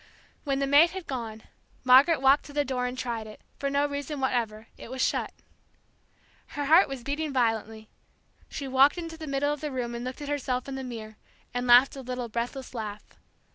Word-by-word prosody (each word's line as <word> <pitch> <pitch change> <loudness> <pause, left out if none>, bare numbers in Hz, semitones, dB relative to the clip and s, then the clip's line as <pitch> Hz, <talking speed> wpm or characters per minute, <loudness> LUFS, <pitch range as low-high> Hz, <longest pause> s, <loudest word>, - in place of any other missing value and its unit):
When 275 -1 0
the 275 - 0
maid 290 +5 +6
had 375 -1 -7
gone 225 -4 -5 0.4
Margaret 270 +3 +6
walked 270 +2 +5
to 290 - -11
the 290 0 +1
door 250 -2 -1
and 250 +1 -6
tried 235 -4 -4
it, 215 - -12 0.2
for 280 - -1
no 280 +1 +2
reason 285 0 -4
whatever; 230 -4 -1
it - - -11
was 260 +1 -6
shut. - - 0 1.3
Her 290 - -1
heart 325 +6 +6
was 270 -3 -6
beating 295 +3 -2
violently. 225 -3 -1 0.6
She 280 - -5
walked 265 +4 +4
into 330 -2 -6
the 320 -1 -8
middle 280 +1 0
of 295 - -7
the 300 - -3
room 245 -3 -3
and 235 0 -5
looked 255 +3 -6
at - - -6
herself 265 -3 -2
in 275 - -5
the 265 0 -5
mirror, 220 -4 -8 0.4
and 245 0 -2
laughed 245 +3 +6
a 270 - -7
little 250 -1 -5
breathless 245 +4 -4
laugh. 210 -3 -5
265 Hz, 205 wpm, -27 LUFS, 240-285 Hz, 1.3 s, maid